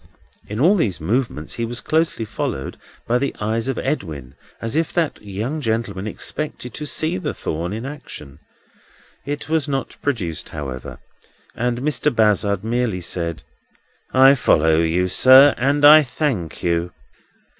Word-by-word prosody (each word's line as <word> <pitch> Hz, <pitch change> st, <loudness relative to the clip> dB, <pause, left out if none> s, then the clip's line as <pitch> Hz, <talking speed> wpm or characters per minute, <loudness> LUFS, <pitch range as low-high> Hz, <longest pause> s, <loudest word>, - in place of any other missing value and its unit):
In 105 Hz, +2 st, -5 dB
all 170 Hz, +9 st, +5 dB
these 110 Hz, -, 0 dB
movements 105 Hz, -, -2 dB
he 115 Hz, -, -3 dB
was 120 Hz, +1 st, -3 dB
closely 155 Hz, -7 st, 0 dB
followed 70 Hz, -9 st, -4 dB, 0.3 s
by 120 Hz, +1 st, +1 dB
the 140 Hz, +1 st, -2 dB
eyes 110 Hz, +3 st, -1 dB
of 135 Hz, -, -2 dB
Edwin, 80 Hz, -, -4 dB, 0.3 s
as 115 Hz, +2 st, -4 dB
if 165 Hz, 0 st, 0 dB
that 165 Hz, -4 st, -1 dB
young 110 Hz, +10 st, -4 dB
gentleman 110 Hz, -5 st, -2 dB
expected 125 Hz, +2 st, -3 dB
to 150 Hz, -, -6 dB
see 155 Hz, -8 st, 0 dB
the -, -, -4 dB
thorn 85 Hz, +3 st, -3 dB
in 110 Hz, +4 st, -5 dB
action. 80 Hz, -, -9 dB, 0.9 s
It 145 Hz, 0 st, -4 dB
was 155 Hz, -1 st, 0 dB
not 135 Hz, -2 st, -3 dB
produced, 95 Hz, -, -3 dB
however, 70 Hz, -4 st, -7 dB, 0.6 s
and 120 Hz, 0 st, -2 dB
Mr. 150 Hz, 0 st, +1 dB
Bazzard 105 Hz, -3 st, +2 dB
merely 115 Hz, -4 st, -1 dB
said: 85 Hz, -1 st, -3 dB, 0.7 s
"I 135 Hz, +1 st, +7 dB
follow 80 Hz, -, +3 dB
you, 85 Hz, +3 st, +1 dB
sir, 130 Hz, +8 st, +7 dB
and 140 Hz, +3 st, +2 dB
I 155 Hz, +1 st, +10 dB
thank 125 Hz, -, -3 dB
you." 85 Hz, 0 st, 0 dB
115 Hz, 145 wpm, -21 LUFS, 90-140 Hz, 0.9 s, I